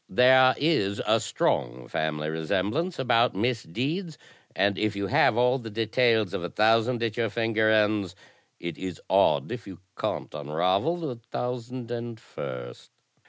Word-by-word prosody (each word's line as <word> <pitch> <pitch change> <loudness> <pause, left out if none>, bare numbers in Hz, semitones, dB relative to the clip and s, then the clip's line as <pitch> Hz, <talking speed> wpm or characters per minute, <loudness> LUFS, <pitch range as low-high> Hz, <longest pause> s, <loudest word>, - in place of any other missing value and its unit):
There 130 +1 +6
is 120 -11 +1
a 110 +1 +3
strong - - -1
family 75 -1 -2
resemblance 100 - -1
about 120 -3 +2
misdeeds, 130 - -2 0.4
and 100 +1 +2
if 105 -1 0
you 100 0 -2
have 100 +3 +3
all 125 +2 +3
the 115 -2 -8
details 110 -1 +1
of 85 - -3
a 85 - -3
thousand 115 +4 +2
at 115 -1 -2
your 115 -2 +1
finger 110 -1 +1
ends, 105 -3 +2 0.4
it 85 -2 -6
is 95 -4 -5
odd - - +3
if 120 -2 -6
you 95 -3 -9 0.2
can't - - -3
unravel 90 - 0
the 150 -8 -5
thousand 125 0 -4
and 120 -1 -5
first. 60 - -8
110 Hz, 150 wpm, -26 LUFS, 95-125 Hz, 0.4 s, There